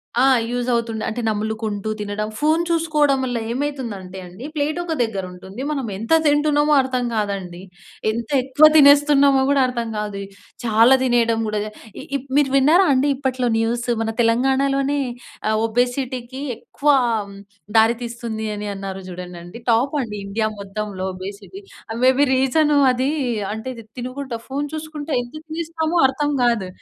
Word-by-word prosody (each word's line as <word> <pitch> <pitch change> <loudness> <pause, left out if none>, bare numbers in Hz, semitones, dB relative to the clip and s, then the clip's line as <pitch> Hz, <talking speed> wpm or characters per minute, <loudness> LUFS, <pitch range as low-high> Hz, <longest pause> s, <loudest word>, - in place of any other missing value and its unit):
ఆ! 245 - +3 0.3
యూజవుతుండె. 235 -2 -1
అంటే 230 +3 -4
నములుకుంటూ 215 -1 -3
తినడం. 210 +1 -3
ఫోన్ 310 +3 +3
చూసుకోవడం 305 -4 +2
వల్లేమైతుందంటే 235 -5 -4
అండి 185 +9 -10
ప్లేటొక 310 +3 -1
దగ్గరుంటుంది 190 0 -6
మనం 275 -5 -2
ఎంత 225 +9 -1
తింటున్నామో 295 0 +3
అర్థం 255 -1 -2
కాదండి. 195 -4 -3 0.5
ఎంతెక్కువ 260 +5 +3
తినేస్తున్నామో 285 -1 +6
కూడా 280 -1 +3
అర్థం 235 -2 -3
కాదు. 205 -1 -4 0.4
చాలా 230 +3 +5
తినేయడం 235 -3 +2
కూడా, 215 0 -1 0.4
ఇ 280 - -3 0.2
మీరు 285 -2 +3
విన్నారండి 290 -1 +4
ఇప్పట్లో 255 -2 -1
న్యూస్ 235 +2 -1
మన 225 - -1
తెలంగాణలోనే 270 +4 +2 0.5
ఆహ్, 215 - +2
ఒబెసిటీకి 245 +2 -2 0.2
ఎక్కువ - - -27 1.0
దారి 225 +2 +5
తీస్తుంది 230 -2 -5
అనన్నారు 195 -2 -5
చూడండండి, 180 +1 -9
టాపండి 235 -1 +1
ఇండియా 215 +2 -1
మొత్తంలో 200 -1 -5
ఒబెసిటీ. 200 - -8 0.4
మే 255 - +7
బీ 285 - +5
రీజనది 270 -1 +3 0.4
అంటే 220 +4 -6 0.3
తినుకుంటా 255 0 -5
ఫోన్ 280 +2 -2
చూసుకుంట 310 -1 -6
ఎంత 245 0 -10
తినేస్తామో 325 +1 -2
అర్థం 290 +2 -1
కాదు. 235 -6 +1
245 Hz, 120 wpm, -21 LUFS, 215-280 Hz, 1.0 s, మే